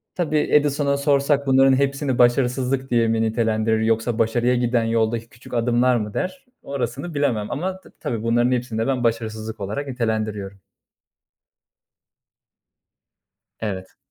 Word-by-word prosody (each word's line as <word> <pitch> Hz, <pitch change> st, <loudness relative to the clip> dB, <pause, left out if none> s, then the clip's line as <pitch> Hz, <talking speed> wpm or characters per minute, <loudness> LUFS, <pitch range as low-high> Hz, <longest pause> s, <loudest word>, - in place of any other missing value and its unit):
Tabii, 155 Hz, -4 st, 0 dB
Edison'a 145 Hz, -1 st, +2 dB
sorsak 140 Hz, 0 st, +2 dB
bunların 135 Hz, 0 st, +5 dB
hepsini 135 Hz, -1 st, 0 dB
başarısızlık 125 Hz, +2 st, +2 dB
diye 115 Hz, -1 st, +3 dB
mi 115 Hz, 0 st, +1 dB
nitelendirir 110 Hz, 0 st, +1 dB
yoksa 115 Hz, +1 st, 0 dB
başarıya 120 Hz, +2 st, +2 dB
giden 120 Hz, -1 st, +1 dB
yoldaki 115 Hz, 0 st, 0 dB
küçük 115 Hz, +2 st, -14 dB
adımlar 120 Hz, +1 st, +2 dB
mı 105 Hz, -3 st, -2 dB
der. 270 Hz, -, -4 dB, 0.2 s
Orasını 140 Hz, +4 st, -4 dB
bilemem 125 Hz, -8 st, 0 dB
ama 185 Hz, +5 st, -3 dB
ta -, -, -17 dB
tabii 115 Hz, -2 st, -3 dB
bunların 120 Hz, +2 st, +2 dB
hepsini 120 Hz, -3 st, -1 dB
de 115 Hz, -, 0 dB
ben 130 Hz, -2 st, 0 dB
başarısızlık 110 Hz, -1 st, -2 dB
olarak 105 Hz, +9 st, -4 dB
nitelendiriyorum. 110 Hz, -5 st, -3 dB, 3.0 s
Evet. 95 Hz, -4 st, -5 dB
120 Hz, 130 wpm, -22 LUFS, 110-135 Hz, 3.0 s, bunların